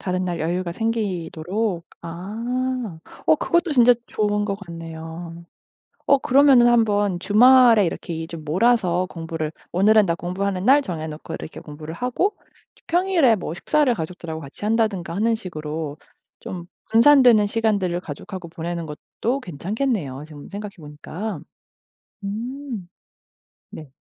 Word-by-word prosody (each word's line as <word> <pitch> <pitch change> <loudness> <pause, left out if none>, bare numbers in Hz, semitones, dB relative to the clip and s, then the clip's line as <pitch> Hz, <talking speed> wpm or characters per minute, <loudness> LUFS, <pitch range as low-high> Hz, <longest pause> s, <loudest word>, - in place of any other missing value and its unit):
다른 185 0 -1
날 175 -3 -3
여유가 175 +2 -1
생기도록. 195 -3 -2 0.2
아 225 +4 -3 0.3
어 155 - +6
그것도 345 - +1
진짜 245 -2 +7
좋은 210 -1 0
것 200 -1 -2
같네요. 165 -1 -8 0.6
어 280 - +5
그러면은 265 -2 +5
한번 205 -5 +2
주말에 230 +1 +6
이렇게 170 0 -4
이 160 0 -4
좀 165 -2 -8
몰아서 185 +1 +2
공부를 165 -2 -4 0.2
오늘은 210 +3 +5
나 170 - +1
공부하는 185 +2 -3
날 275 +5 +6
정해 160 - -4
놓고 155 0 -7
이렇게 - - -8
공부를 155 +1 -9
하고 250 - -1 0.4
저 - - -25
평일에 345 -8 +3
뭐 180 - -5
식사를 285 +7 +2
가족들하고 160 -3 -6
같이 140 +7 -10
한다든가 210 -6 0
하는 225 +4 +2
식으로 155 -6 -5 0.4
좀 175 -2 -7 0.3
분산되는 235 -3 +6
시간들을 205 -5 0
가족하고 175 +3 -8
보내는 170 0 -5
것도 225 - -3
괜찮겠네요 180 - -3
지금 145 -2 -11
생각해 205 0 -7
보니까. 155 +5 -6 0.8
음. 230 0 -5 0.8
네. 150 -4 -10
190 Hz, 305 characters per minute, -22 LUFS, 165-230 Hz, 0.8 s, 진짜